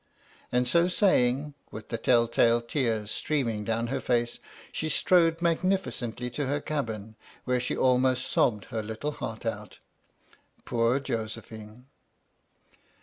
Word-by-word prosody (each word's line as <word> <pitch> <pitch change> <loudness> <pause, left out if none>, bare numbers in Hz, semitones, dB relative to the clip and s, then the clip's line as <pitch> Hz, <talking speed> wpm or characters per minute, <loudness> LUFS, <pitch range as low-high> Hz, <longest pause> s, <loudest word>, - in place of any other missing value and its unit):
And 125 0 +2
so 170 +7 +4
saying, 150 - +2 0.2
with 110 - -9
the 115 - -2
tell 115 0 +4
tale 115 0 +4
tears 115 -4 -1
streaming 120 -8 -1
down 115 +2 -1
her - - -1
face, 120 -1 0 0.3
she 155 - -2
strode 165 +1 +3
magnificently 165 -9 0
to 135 +3 -2
her 145 +2 0
cabin, 110 -9 -4 0.3
where 125 0 +1
she 125 - -2
almost 130 0 +3
sobbed 105 -4 +1
her 110 - -1
little 110 +7 -4
heart 110 -5 -6
out. 105 -2 -4 0.9
Poor 120 +2 +2
Josephine! 110 -1 -6
125 Hz, 130 wpm, -28 LUFS, 115-145 Hz, 0.9 s, so